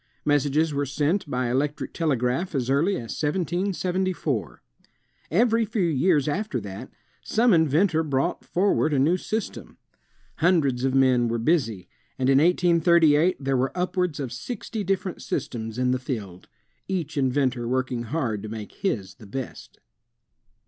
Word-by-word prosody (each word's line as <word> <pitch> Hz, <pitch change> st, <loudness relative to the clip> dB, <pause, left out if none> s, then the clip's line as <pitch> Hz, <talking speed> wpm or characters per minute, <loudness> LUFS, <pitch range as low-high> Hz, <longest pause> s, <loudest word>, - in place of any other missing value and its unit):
Messages 145 Hz, +2 st, +2 dB
were 140 Hz, 0 st, -1 dB
sent 150 Hz, +5 st, 0 dB
by 125 Hz, -2 st, -1 dB
electric 145 Hz, +3 st, -1 dB
telegraph 145 Hz, +2 st, 0 dB
as 130 Hz, -1 st, 0 dB
early 160 Hz, +9 st, +2 dB
as 115 Hz, -9 st, -5 dB
1774. 175 Hz, -, -1 dB, 0.7 s
Every 230 Hz, +5 st, +3 dB
few 215 Hz, -2 st, -1 dB
years 155 Hz, -1 st, +2 dB
after 190 Hz, -, -1 dB
that, 100 Hz, -2 st, -8 dB, 0.3 s
some 230 Hz, 0 st, +3 dB
inventor 160 Hz, +1 st, +3 dB
brought 145 Hz, +2 st, -1 dB
for 195 Hz, +3 st, +1 dB
ward 155 Hz, -1 st, +1 dB
a -, -, +2 dB
new 150 Hz, +7 st, +3 dB
system. 215 Hz, +3 st, -5 dB, 0.6 s
Hundreds 155 Hz, -8 st, +2 dB
of 135 Hz, 0 st, +1 dB
men 130 Hz, -3 st, +4 dB
were 115 Hz, 0 st, -1 dB
busy, 115 Hz, -, 0 dB, 0.3 s
and 130 Hz, +1 st, +2 dB
in 135 Hz, -, +5 dB
1838 170 Hz, -1 st, +4 dB
there 135 Hz, -1 st, -1 dB
were 130 Hz, +3 st, -1 dB
upwards 180 Hz, -3 st, -1 dB
of 135 Hz, -4 st, -4 dB
sixty 210 Hz, -, -5 dB
different 190 Hz, -1 st, -2 dB
systems 115 Hz, -2 st, -4 dB
in 125 Hz, 0 st, +1 dB
the 130 Hz, -, 0 dB
field, 105 Hz, -9 st, -6 dB, 0.4 s
each 170 Hz, -6 st, -3 dB
inventor 130 Hz, -3 st, 0 dB
working 130 Hz, -1 st, -1 dB
hard 115 Hz, -6 st, -2 dB
to 110 Hz, -, -7 dB
make 110 Hz, -1 st, -7 dB
his 100 Hz, -, -3 dB
the 105 Hz, -, -15 dB
best. 130 Hz, +4 st, -7 dB
145 Hz, 145 wpm, -25 LUFS, 125-175 Hz, 0.7 s, in